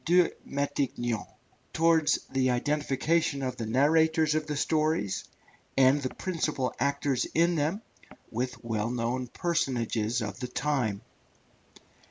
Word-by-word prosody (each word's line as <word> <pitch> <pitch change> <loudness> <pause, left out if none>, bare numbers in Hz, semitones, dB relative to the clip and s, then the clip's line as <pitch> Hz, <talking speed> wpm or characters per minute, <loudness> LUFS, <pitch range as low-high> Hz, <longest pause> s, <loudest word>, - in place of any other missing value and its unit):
de 175 0 +4
Montaiglon, 135 -5 -2 0.5
towards 165 -1 +4
the 130 -1 +2
identification 145 +3 0
of 130 -1 -3
the 115 - -4
narrators 155 +5 +3
of 155 0 -1
the 150 -1 -2
stories, 155 - 0 0.5
and 135 +2 +5
the 130 - -4
principal 155 -8 -1
actors 140 -1 +1
in 170 +2 +4
them, 160 +5 0 0.5
with 125 +2 -3
well 115 -1 -1
known 125 +1 -2
personages 120 - -1
of 105 - -5
the 125 - -3
time. 125 -6 -1
140 Hz, 120 wpm, -28 LUFS, 125-155 Hz, 0.5 s, and